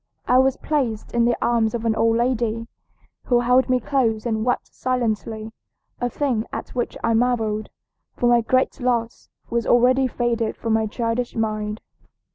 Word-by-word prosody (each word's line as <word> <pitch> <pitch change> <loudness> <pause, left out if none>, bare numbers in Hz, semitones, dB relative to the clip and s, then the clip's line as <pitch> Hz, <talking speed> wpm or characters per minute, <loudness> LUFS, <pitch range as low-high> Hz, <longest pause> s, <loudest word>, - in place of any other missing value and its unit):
I 250 - +5
was 265 0 +3
placed 255 -8 -2
in 235 -1 +2
the 240 0 +2
arms 230 -2 +1
of 230 -1 -4
an 225 - +3
old 225 0 +2
lady, 235 -2 0 0.6
who 240 -1 +3
held 250 +2 +3
me 255 0 +3
close 230 -4 0
and 220 -2 -1
wept 245 +1 -1
silently, 225 -3 -2 0.5
a 245 - -1
thing 245 -4 -1
at - - -5
which 245 -1 -3
I 230 - +2
marveled, 225 -3 0 0.5
for 240 - +1
my 240 0 +5
great 255 +3 +1
loss 240 -2 -1 0.2
was 235 -1 0
already 255 +2 +4
faded 235 -2 -1
from 225 -1 -1
my 220 0 +2
childish 230 +2 -2
mind. 215 -1 -2
235 Hz, 165 wpm, -22 LUFS, 225-250 Hz, 0.6 s, I